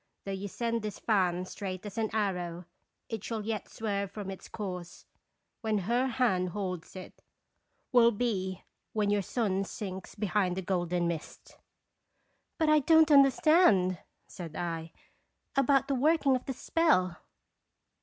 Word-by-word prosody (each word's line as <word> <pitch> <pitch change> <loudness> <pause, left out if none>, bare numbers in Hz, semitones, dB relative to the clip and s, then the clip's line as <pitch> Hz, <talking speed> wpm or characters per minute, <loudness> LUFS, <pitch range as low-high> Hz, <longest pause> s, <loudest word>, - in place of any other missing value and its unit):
Though 195 - -3
you 195 +1 -4
send 230 +3 -2
this 210 -2 -5
fan 185 -4 +1
straight 185 0 -6
as 205 - -7
an 220 -1 0
arrow, 180 -5 -2 0.4
it 225 -3 -5
shall 220 -3 -4
yet 220 -2 -3
swerve 200 -3 -2
from 200 -1 -6
its 190 - -10
course. 180 -5 -6 0.6
When 220 -2 0
her 235 +7 +1
hand 230 -8 +1
holds 180 -3 -5
it, 185 - -10 0.7
will 240 -2 +6
be 200 -5 -2 0.3
when 210 -2 +1
your 205 -1 +2
sun 195 -1 -1
sinks 190 -2 -7
behind 200 -3 0
a 190 - -2
golden 175 -1 0
mist!" 170 -2 -6 1.0
"But 320 - +1
I 305 0 +6
don't 320 +2 +5
understand/' 275 - +5 0.3
said 165 -4 -9
I, 165 -1 -4 0.6
"about 275 0 +3
the 280 - 0
working 280 0 +3
of 255 - -4
the 265 - -3
spell." 185 - +2
205 Hz, 145 wpm, -30 LUFS, 185-240 Hz, 1.0 s, will